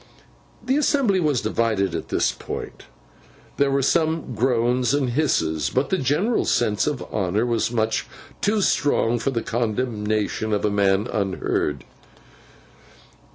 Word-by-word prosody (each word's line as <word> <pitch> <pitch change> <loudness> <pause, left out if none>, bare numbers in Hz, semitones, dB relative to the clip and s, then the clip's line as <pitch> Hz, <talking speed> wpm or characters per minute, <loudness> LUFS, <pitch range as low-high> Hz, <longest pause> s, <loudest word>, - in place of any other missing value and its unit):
The 260 +3 +2
assembly 275 -10 +2
was 150 -7 +1
divided 110 -3 0
at - - -4
this - - +1
point. - - -7 0.7
There 140 0 +3
were 135 0 +1
some 160 -2 +1
groans 125 +1 +1
and 135 -4 0
hisses, 80 - 0
but 130 +2 -1
the 190 - +1
general 160 - +1
sense 110 -1 +1
of 145 -5 -2
honour 105 +2 0
was 115 -2 0
much 110 -2 -1 0.3
too 210 +1 +1
strong 120 -8 +2
for 125 - -1
the 120 -4 -2
condemnation 110 -2 -1
of 105 - 0
a 105 - +1
man 100 0 +2
unheard. 95 - -2
120 Hz, 135 wpm, -23 LUFS, 105-145 Hz, 0.7 s, There